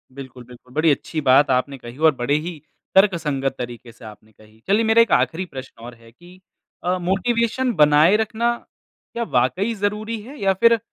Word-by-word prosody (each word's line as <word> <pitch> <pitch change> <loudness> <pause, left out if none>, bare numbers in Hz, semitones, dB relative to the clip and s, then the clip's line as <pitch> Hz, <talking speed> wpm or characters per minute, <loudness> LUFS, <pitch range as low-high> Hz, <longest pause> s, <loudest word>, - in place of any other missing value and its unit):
बिल्कुल, 130 -2 -10
बिल्कुल। 125 +1 -17
बड़ी 155 0 +3
अच्छी 155 +2 -3
बात 140 +2 +4
आपने 135 +2 -1
कही 120 0 -12
और 155 -2 +3
बड़े 125 +4 0
ही 175 -3 -6 0.4
तर्कसंगत 155 -9 +2
तरीके 120 -1 -8
से 115 0 -16
आपने 110 0 -14
कही। 110 +1 -22
चलिए, 210 +3 +2
मेरा 225 +1 +4
एक 230 - +1
आख़िरी 180 +3 +1
प्रश्न 130 -6 -11
और 120 0 -10
है 115 0 -19
कि 175 +9 -18 0.4
अ, 180 +1 0
मोटिवेशन 230 +7 0
बनाए 150 +4 +5
रखना, 225 +2 -1 0.6
क्या 235 - -2
वाक़ई 185 - 0
ज़रूरी 210 +2 -3
है 270 +7 -12
या 195 -1 +2
फिर 230 -1 +5
160 Hz, 180 wpm, -21 LUFS, 125-210 Hz, 0.6 s, बनाए